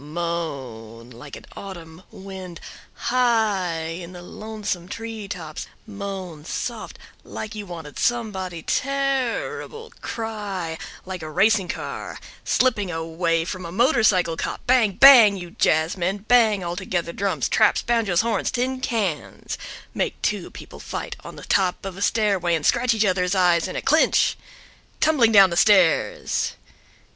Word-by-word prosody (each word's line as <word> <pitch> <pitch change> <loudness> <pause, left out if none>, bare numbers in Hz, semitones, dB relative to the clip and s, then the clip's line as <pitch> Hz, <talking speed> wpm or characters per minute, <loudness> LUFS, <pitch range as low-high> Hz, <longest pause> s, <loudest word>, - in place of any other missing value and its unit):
Moan 135 -9 -5
like 125 +4 -10
an - - -12
autumn 170 -4 -9
wind 190 -2 -9 0.4
high 220 -9 +1
in 170 +2 -6
the 175 -1 -10
lonesome 210 -3 -5
tree 225 0 -6
tops, 165 -6 -6 0.2
moan 195 -6 -7
soft 165 - -5 0.3
like 215 0 -7
you 210 -2 -7
wanted 165 -4 -8
somebody 190 -8 -1
terrible, 275 - -2
cry 205 -7 -4 0.3
like 185 -1 -6
a 155 - -6
racing 200 +4 +3
car - - -5 0.3
slipping 210 -7 +1
away 165 0 -1
from 185 +1 -5
a 170 - -7
motorcycle 215 - +3
cop, - - -4
bang 245 -5 +3
bang! 230 -4 +8
you 175 -2 -8
jazzmen, 175 +7 0
bang 220 -5 +4
altogether 170 0 -3
drums, 190 -9 -1
traps, - - +3
banjoes, 225 -7 +2
horns, 225 -3 0
tin 255 +1 -1
cans—make 215 - -4
two - - -1
people - - -11
fight - - -5
on - - -9
the - - -11
top 190 -1 +1
of 195 -2 -5
a 195 - -9
stairway 200 -5 +2
and 155 - -3
scratch 240 -1 +3
each 215 0 +2
other's 185 0 +1
eyes 175 -2 +3
in 185 - -6
a - - -3
clinch 315 +2 +3 0.6
tumbling 275 -8 +4
down 195 -4 +7
the - - -1
stairs. 185 -4 +3
190 Hz, 135 wpm, -23 LUFS, 170-220 Hz, 0.6 s, bang